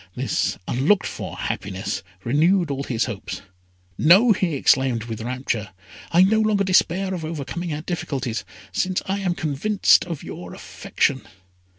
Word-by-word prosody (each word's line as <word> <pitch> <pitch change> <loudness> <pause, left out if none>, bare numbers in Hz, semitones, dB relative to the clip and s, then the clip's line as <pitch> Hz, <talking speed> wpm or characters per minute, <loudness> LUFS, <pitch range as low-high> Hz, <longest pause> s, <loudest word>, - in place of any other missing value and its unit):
This - - -1
unlooked 145 +11 +2
for - - -6
happiness 95 +1 -3 0.2
renewed 160 +6 +2
all 140 0 -2
his 120 -4 -1
hopes. 115 -6 -6 0.6
"No!" 195 +10 +6
he 185 -6 +1
exclaimed 130 -4 +2
with 115 -1 -6
rapture; 120 -3 -3 0.4
"I 175 +2 +6
no 220 +3 +3
longer 215 -2 +2
despair 190 0 +2
of 175 -3 -4
overcoming 165 +2 -4
our 150 0 -3
difficulties, 135 -8 -3 0.3
since 185 -1 -1
I 195 +1 -1
am 185 -3 -1
convinced 160 +8 +3
of 170 -4 -6
your 90 0 -8
affection. - - -1
160 Hz, 145 wpm, -23 LUFS, 125-185 Hz, 0.6 s, No